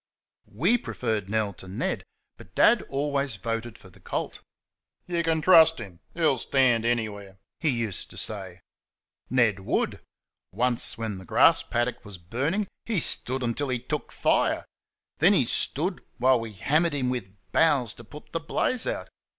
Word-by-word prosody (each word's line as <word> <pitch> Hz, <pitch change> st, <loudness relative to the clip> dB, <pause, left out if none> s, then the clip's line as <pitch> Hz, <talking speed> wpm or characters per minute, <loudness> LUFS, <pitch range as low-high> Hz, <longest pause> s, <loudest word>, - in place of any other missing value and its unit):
WE 215 Hz, -, +2 dB
preferred 110 Hz, -, -3 dB
Nell 110 Hz, -2 st, 0 dB
to 95 Hz, -, -12 dB
Ned, 95 Hz, -, -2 dB, 0.3 s
but -, -, -16 dB
Dad -, -, +5 dB
always 140 Hz, -2 st, -1 dB
voted 115 Hz, +3 st, -4 dB
for 95 Hz, -, -16 dB
the -, -, -19 dB
colt. -, -, -4 dB, 0.7 s
"You 170 Hz, -1 st, -1 dB
can 160 Hz, -1 st, 0 dB
trust 160 Hz, -1 st, +7 dB
him; 95 Hz, -7 st, -9 dB, 0.2 s
he'll 160 Hz, -6 st, +2 dB
stand 120 Hz, -2 st, +2 dB
anywhere," 105 Hz, -5 st, -2 dB, 0.2 s
he 160 Hz, -, +1 dB
used 115 Hz, -, -3 dB
to -, -, -13 dB
say. 95 Hz, -4 st, -5 dB, 0.7 s
Ned 115 Hz, -6 st, +3 dB
WOULD! 95 Hz, -, -1 dB, 0.5 s
Once, 120 Hz, +4 st, +1 dB
when 110 Hz, -4 st, -4 dB
the 95 Hz, -, -12 dB
grass -, -, +5 dB
paddock 120 Hz, +1 st, -2 dB
was 105 Hz, -4 st, -10 dB
burning, 140 Hz, -, -2 dB, 0.2 s
he 220 Hz, -5 st, 0 dB
stood 130 Hz, -3 st, 0 dB
until 125 Hz, +4 st, -1 dB
he 125 Hz, -, 0 dB
took 120 Hz, -, -5 dB
fire. -, -, +1 dB, 0.5 s
Then 180 Hz, +6 st, +6 dB
he 140 Hz, -10 st, +3 dB
stood 165 Hz, +9 st, 0 dB, 0.2 s
while 130 Hz, 0 st, +4 dB
we 115 Hz, -1 st, -6 dB
hammered 155 Hz, -, +1 dB
him 130 Hz, -3 st, 0 dB
with 105 Hz, -6 st, -5 dB, 0.2 s
boughs 135 Hz, -8 st, +3 dB
to 120 Hz, -, -13 dB
put 150 Hz, +7 st, -13 dB
the 165 Hz, -, -1 dB
blaze 230 Hz, +9 st, -1 dB
out. -, -, -3 dB
120 Hz, 160 wpm, -26 LUFS, 110-150 Hz, 0.7 s, trust